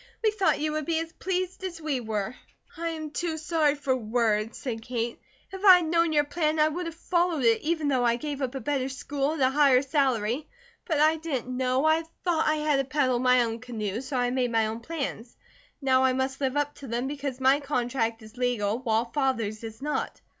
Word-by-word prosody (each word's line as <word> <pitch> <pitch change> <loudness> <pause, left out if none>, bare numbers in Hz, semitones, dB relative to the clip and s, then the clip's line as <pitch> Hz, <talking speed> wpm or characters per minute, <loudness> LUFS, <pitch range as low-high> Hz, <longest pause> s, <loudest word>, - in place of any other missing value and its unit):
We 435 - +4
thought 405 -3 +1
you 305 +1 0
would 310 -1 -3
be 330 -1 +1
as 325 +1 -3
pleased 370 0 -3
as 360 -3 -5
we 305 -5 -1
were." 220 -2 -3 0.4
"I 335 0 -2
am 310 -2 -5
too 325 +1 -2
sorry 310 -2 +1
for 280 -2 0
words," 225 -2 0
said 230 -4 -4
Kate. 235 0 -3 0.3
"If 385 +1 -8
I 380 -3 +10
had 350 - -1
known 335 -1 +3
your 295 -1 +4
plan, 305 +1 -1
I 305 0 +4
would 345 +3 -4
have 330 - -6
followed 340 -3 0
it, 230 -1 +4
even 315 -1 0
though 260 -3 +2
I 235 -1 +3
gave 285 +2 -5
up 260 0 -2
a - - -2
better 275 -3 -1
school 275 +2 -2
at 320 - -4
a 260 0 +4
higher 275 -2 +5
salary. 265 -2 0 0.4
But 315 -5 0
I 310 +1 +4
didn't 265 -6 -3
know. 255 +2 +1
I 315 +1 +4 0.2
thought 340 -3 +1
I 310 - +3
had 300 -2 +1
to 275 - +2
paddle 265 -3 +1
my 250 0 +4
own 230 0 -3
canoe, 225 -3 -4
so 265 0 -4
I 245 0 +1
made 250 -2 0
my 225 -1 +2
own 220 +1 -3
plans. 265 -4 -5 0.5
Now 260 -1 +4
I 260 -1 +3
must 265 +1 -2
live 265 +1 0
up 290 0 0
to 275 - -9
them, 240 +2 -2
because 275 -2 -4
my 265 +2 +4
contract 245 -5 -1
is 220 +3 -14
legal, 235 -3 0
while 230 -2 +1
Father's 230 -5 -1
is 225 +3 -8
not. 300 0 -2
270 Hz, 225 wpm, -27 LUFS, 245-310 Hz, 0.5 s, I